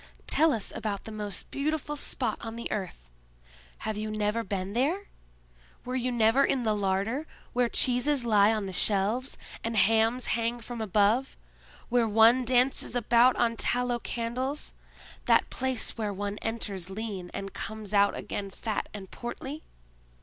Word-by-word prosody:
"Tell 320 Hz, +1 st, +4 dB
us 225 Hz, -6 st, -2 dB
about 205 Hz, -2 st, -3 dB
the 220 Hz, -, -8 dB
most 210 Hz, -2 st, -4 dB
beautiful 295 Hz, +1 st, -2 dB
spot 290 Hz, -, -2 dB
on 225 Hz, -1 st, -6 dB
the 235 Hz, -, -5 dB
earth. 185 Hz, -, -5 dB, 0.8 s
Have 220 Hz, -1 st, -2 dB
you 215 Hz, 0 st, -3 dB
never 215 Hz, +1 st, -1 dB
been 195 Hz, -2 st, -3 dB
there? 310 Hz, -, 0 dB, 0.8 s
Were 250 Hz, +1 st, -3 dB
you 255 Hz, 0 st, 0 dB
never 235 Hz, +3 st, +4 dB
in 260 Hz, -3 st, +1 dB
the 215 Hz, -2 st, +2 dB
larder, 205 Hz, +8 st, -1 dB, 0.3 s
where 245 Hz, -1 st, +2 dB
cheeses 255 Hz, +2 st, +2 dB
lie 210 Hz, -2 st, +5 dB
on 215 Hz, -2 st, -1 dB
the 190 Hz, -, -6 dB
shelves, 210 Hz, +6 st, +1 dB, 0.3 s
and 230 Hz, -1 st, -2 dB
hams 225 Hz, +4 st, +3 dB
hang 230 Hz, +1 st, -1 dB
from 235 Hz, 0 st, -6 dB
above; 215 Hz, +5 st, +2 dB, 0.5 s
where 240 Hz, -1 st, +3 dB
one 225 Hz, +4 st, +5 dB
dances 255 Hz, +1 st, +3 dB
about 240 Hz, +1 st, +4 dB
on 230 Hz, -1 st, +1 dB
tallow 245 Hz, +1 st, +1 dB
candles; 250 Hz, +6 st, -3 dB, 0.5 s
that -, -, +3 dB
place 260 Hz, -3 st, -1 dB
where 210 Hz, -2 st, -1 dB
one 200 Hz, +1 st, -4 dB
enters 205 Hz, -5 st, -3 dB
lean, 195 Hz, -3 st, -5 dB
and 195 Hz, 0 st, -6 dB
comes 215 Hz, -1 st, -6 dB
out 200 Hz, 0 st, +4 dB
again 200 Hz, -1 st, -4 dB
fat 215 Hz, +2 st, -4 dB
and 190 Hz, -2 st, -8 dB
portly?" 265 Hz, +5 st, -6 dB
225 Hz, 155 wpm, -28 LUFS, 205-250 Hz, 0.8 s, lie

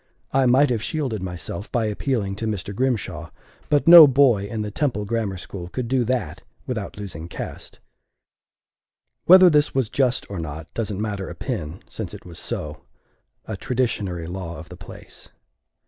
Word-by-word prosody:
I 135 Hz, -1 st, +3 dB
might 130 Hz, +2 st, +4 dB
have 115 Hz, -3 st, 0 dB
shielded 130 Hz, -, -2 dB
myself 90 Hz, +1 st, -6 dB
by 120 Hz, -2 st, +1 dB
appealing 105 Hz, -2 st, -1 dB
to 110 Hz, -, -3 dB
Mr. 100 Hz, -2 st, -4 dB
Grimshaw; 100 Hz, -10 st, -2 dB, 0.4 s
but 145 Hz, +2 st, +2 dB
no 165 Hz, -2 st, +12 dB
boy 130 Hz, -7 st, +4 dB
in 110 Hz, 0 st, -3 dB
the 105 Hz, -, -5 dB
Temple 115 Hz, -5 st, -1 dB
Grammar 105 Hz, -3 st, -2 dB
School 90 Hz, 0 st, -8 dB
could 125 Hz, +4 st, -4 dB
do 130 Hz, 0 st, +1 dB
that 125 Hz, 0 st, -2 dB, 0.2 s
without 110 Hz, -6 st, -5 dB
losing 90 Hz, -5 st, -7 dB
caste. -, -, -8 dB, 1.5 s
Whether 185 Hz, +1 st, +9 dB
this 150 Hz, -4 st, +3 dB
was 130 Hz, -5 st, +1 dB
just 125 Hz, -2 st, 0 dB
or 100 Hz, -3 st, -6 dB
not 80 Hz, 0 st, -7 dB
doesn't 105 Hz, -3 st, -3 dB
matter 105 Hz, -3 st, -3 dB
a -, -, -8 dB
pin, 75 Hz, +4 st, -5 dB
since -, -, -6 dB
it -, -, -13 dB
was 85 Hz, -2 st, -8 dB
so -, -, -4 dB, 0.6 s
a 110 Hz, -, -5 dB
traditionary 100 Hz, -7 st, -2 dB
law 85 Hz, -1 st, -6 dB
of 80 Hz, +2 st, -11 dB
the -, -, -9 dB
place. -, -, -12 dB
110 Hz, 165 wpm, -23 LUFS, 95-130 Hz, 1.5 s, no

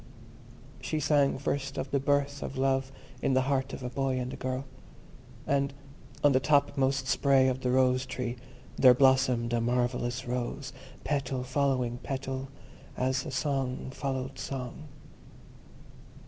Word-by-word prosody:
She 155 Hz, -, -2 dB
sang 145 Hz, -2 st, +3 dB
first 140 Hz, 0 st, -2 dB
of 135 Hz, -, -3 dB
the 140 Hz, -, +2 dB
birth 140 Hz, 0 st, +1 dB
of 135 Hz, -, -5 dB
love 135 Hz, 0 st, +1 dB, 0.3 s
in 135 Hz, -, +2 dB
the 130 Hz, -, +4 dB
heart 135 Hz, 0 st, 0 dB
of -, -, -7 dB
a 125 Hz, -, -3 dB
boy 135 Hz, -1 st, 0 dB
and 125 Hz, +1 st, -4 dB
a -, -, -4 dB
girl. 130 Hz, +1 st, -3 dB, 0.8 s
And 140 Hz, 0 st, 0 dB, 0.5 s
on 145 Hz, -, +6 dB
the 130 Hz, -, +4 dB
top 145 Hz, 0 st, +3 dB
most 135 Hz, -1 st, +1 dB
spray 135 Hz, 0 st, +4 dB
of 130 Hz, 0 st, -1 dB
the 125 Hz, -, 0 dB
Rose 130 Hz, 0 st, +3 dB
tree 125 Hz, -1 st, -4 dB, 0.4 s
there 125 Hz, -2 st, +7 dB
blossomed 130 Hz, -3 st, +3 dB
a 120 Hz, -, +2 dB
marvellous 120 Hz, +1 st, -1 dB
rose, 125 Hz, +3 st, -3 dB, 0.3 s
petal 135 Hz, -3 st, -1 dB
following 130 Hz, -2 st, 0 dB
petal, 135 Hz, 0 st, -4 dB, 0.5 s
as 130 Hz, +1 st, 0 dB
song 135 Hz, -2 st, -2 dB
followed 135 Hz, -1 st, -4 dB
song. 135 Hz, +3 st, -5 dB
130 Hz, 145 wpm, -29 LUFS, 125-140 Hz, 0.8 s, there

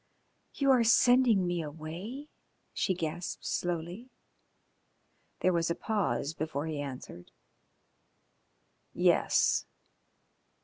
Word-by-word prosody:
"You 275 Hz, -1 st, +3 dB
are 250 Hz, -3 st, +5 dB
sending 230 Hz, -3 st, +5 dB
me 175 Hz, -1 st, -1 dB
away?" 165 Hz, -, -7 dB, 0.4 s
she 190 Hz, -, 0 dB
gasped 170 Hz, +1 st, -4 dB
slowly. 175 Hz, +7 st, -3 dB, 1.3 s
There 185 Hz, -, +3 dB
was 170 Hz, -1 st, +1 dB
a 170 Hz, -, 0 dB
pause 200 Hz, -8 st, -1 dB
before 155 Hz, -2 st, -3 dB
he 155 Hz, -3 st, -3 dB
answered. 125 Hz, -11 st, -8 dB, 1.7 s
"Yes." -, -, +3 dB
175 Hz, 90 wpm, -30 LUFS, 155-220 Hz, 1.7 s, are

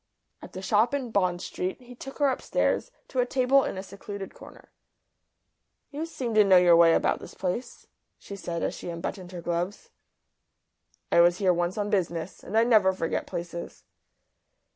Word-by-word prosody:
At -, -, -11 dB
the 185 Hz, -, -7 dB
shop 220 Hz, +7 st, +2 dB
in 255 Hz, -4 st, -4 dB
Bond 185 Hz, -4 st, +1 dB
Street 185 Hz, +1 st, -4 dB
he 250 Hz, -1 st, -13 dB
took 270 Hz, +2 st, -10 dB
her 285 Hz, -2 st, +3 dB
upstairs 260 Hz, -, 0 dB, 0.2 s
to 260 Hz, -, -3 dB
a 245 Hz, -, +4 dB
table 265 Hz, +2 st, +3 dB
in -, -, -4 dB
a 190 Hz, -, -4 dB
secluded 200 Hz, 0 st, -8 dB
corner. -, -, -15 dB, 1.2 s
"You 305 Hz, +3 st, -4 dB
seem 250 Hz, -7 st, -4 dB
to 215 Hz, -1 st, +6 dB
know 190 Hz, -2 st, +6 dB
your 175 Hz, -1 st, +6 dB
way 165 Hz, -1 st, +6 dB
about -, -, +1 dB
this -, -, -11 dB
place," 195 Hz, +7 st, -4 dB, 0.3 s
she 200 Hz, -, -9 dB
said, 170 Hz, -3 st, -4 dB
as -, -, -1 dB
she -, -, -7 dB
unbuttoned 175 Hz, +2 st, -5 dB
her 175 Hz, -2 st, -7 dB
gloves. 175 Hz, -, -3 dB, 1.2 s
"I 170 Hz, -, +6 dB
was 175 Hz, +1 st, +4 dB
here 190 Hz, -2 st, +3 dB
once 175 Hz, +2 st, -1 dB
on 205 Hz, 0 st, -2 dB
business. 170 Hz, -3 st, -2 dB
And 205 Hz, +5 st, -2 dB
I 225 Hz, -, +6 dB
never 215 Hz, -5 st, +4 dB
forget 165 Hz, -3 st, -2 dB
places." 170 Hz, 0 st, -6 dB
190 Hz, 180 wpm, -27 LUFS, 175-235 Hz, 1.2 s, to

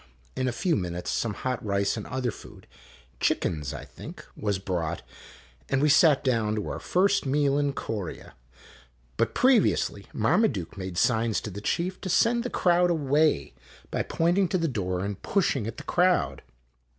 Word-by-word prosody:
In 130 Hz, 0 st, -1 dB
a -, -, +1 dB
few 175 Hz, +4 st, 0 dB
minutes 90 Hz, -5 st, -3 dB
some 110 Hz, -3 st, -1 dB
hot 130 Hz, -2 st, -3 dB
rice 100 Hz, -1 st, 0 dB
and 110 Hz, -, -6 dB
other 125 Hz, -2 st, -2 dB
food -, -, -13 dB, 0.5 s
(chickens, 75 Hz, -4 st, 0 dB
I 75 Hz, -, -7 dB
think) -, -, -11 dB
w -, -, -10 dB
r -, -, +2 dB
as 100 Hz, -, +1 dB
brought, 85 Hz, -4 st, -3 dB, 0.7 s
and 135 Hz, -, +2 dB
we 150 Hz, +2 st, +3 dB
sat 150 Hz, -1 st, +5 dB
down 115 Hz, -5 st, +1 dB
to 105 Hz, -, -3 dB
our -, -, -4 dB
first 195 Hz, -2 st, +2 dB
meal 140 Hz, 0 st, +2 dB
in 145 Hz, -1 st, 0 dB
Corea. 105 Hz, -9 st, -5 dB, 0.8 s
But 115 Hz, -, 0 dB
previously 255 Hz, -2 st, +2 dB
Marmaduke 105 Hz, -, +1 dB
made 95 Hz, -2 st, -6 dB
signs 115 Hz, +1 st, +2 dB
to 105 Hz, -, -6 dB
the 100 Hz, +2 st, -7 dB
chief 180 Hz, -, -2 dB
to 190 Hz, -, -4 dB
send 235 Hz, +6 st, +3 dB
the 250 Hz, -, -3 dB
crowd 175 Hz, -3 st, +3 dB
away, 150 Hz, -, +2 dB, 0.4 s
by -, -, 0 dB
pointing 175 Hz, +4 st, +1 dB
to 180 Hz, -, 0 dB
the 165 Hz, -2 st, 0 dB
door 95 Hz, -, -2 dB
and 100 Hz, -1 st, -5 dB
push 195 Hz, -7 st, +1 dB
ing 115 Hz, -6 st, -2 dB
at 115 Hz, -, -6 dB
the -, -, -7 dB
crowd. 175 Hz, -, +2 dB
130 Hz, 180 wpm, -27 LUFS, -, 0.8 s, sat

